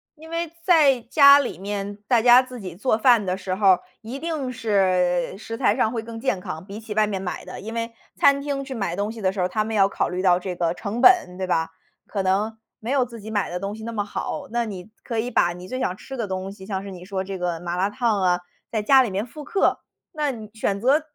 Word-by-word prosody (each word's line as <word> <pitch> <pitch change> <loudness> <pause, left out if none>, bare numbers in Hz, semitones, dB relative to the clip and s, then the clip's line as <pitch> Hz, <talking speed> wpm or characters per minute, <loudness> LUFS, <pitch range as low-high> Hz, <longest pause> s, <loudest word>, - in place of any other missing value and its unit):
因 320 +1 -13
为 335 -1 -3
在 300 -8 +5
家 280 +4 +7
里 195 - -3
面 200 +1 -4
大 235 -1 +3
家 245 +1 +8
自 255 -1 -9
己 185 -4 -7
做 215 +3 +1
饭 235 -3 +4
的 185 0 -1
时 185 -1 -3
候 200 0 +2
儿， 185 -2 +6 0.2
一 240 +5 -7
定 310 -6 -3
是 185 -6 +1
食 225 +2 -7
材 215 - +2
上 220 -3 +2
会 230 - -2
更 225 0 -8
健 200 -7 -1
康， 160 0 -6
比 200 +1 -8
起 215 -1 -6
外 215 0 +3
面 195 -2 -3
买 180 - -5
的， - - -8
因 225 +3 -7
为 230 0 -3 0.2
餐 280 0 +5
厅 280 -1 -3
去 265 - -6
买 195 -6 -3
东 205 +1 -1
西 225 -1 -7
的 190 -1 +2
时 195 - -7
候 180 - +2
儿， - - +1
他 215 +4 -1
们 220 +1 -4
要 195 -2 +5
考 - - -1
虑 180 +1 -3
到 180 -2 +4
这 180 -1 -5
个 170 -1 +1
成 205 +6 -5
本， 260 - +5
对 185 -1 -3
吧？ 165 -2 +1 0.4
可 200 - -3
能 205 +4 0 0.2
没 235 +4 -4
有 265 -3 +3
自 230 -3 -11
己 220 +1 -8
买 205 -2 0
的 175 - -3
东 200 +1 -3
西 220 +1 -8
那 230 - -5
么 205 -2 -1
好。 205 - -5
那 235 0 0
你 200 -1 -8
可 230 -3 -2
以 245 +3 -2
把 175 0 +2
你 180 +1 -10
最 255 - -3
想 185 -6 -1
吃 265 +6 -9
的 230 - -2
东 190 0 -4
西， 195 -1 -12
像 195 -1 -3
是 200 - -7
你 180 -1 -10
说 190 -1 -3
这 190 0 -5
个 175 -2 -2
麻 175 0 -3
辣 190 +2 +1
汤 220 -3 0
啊， 180 -1 +2 0.3
在 220 -2 -1
家 265 +5 +6
里 245 - 0
面 195 +3 -2
复 295 +5 -10
刻。 395 - +1 0.3
那 300 -4 -1
你 220 -3 -9
选 200 -2 -1
择 275 +5 +4
210 Hz, 285 characters per minute, -23 LUFS, 190-245 Hz, 0.4 s, 家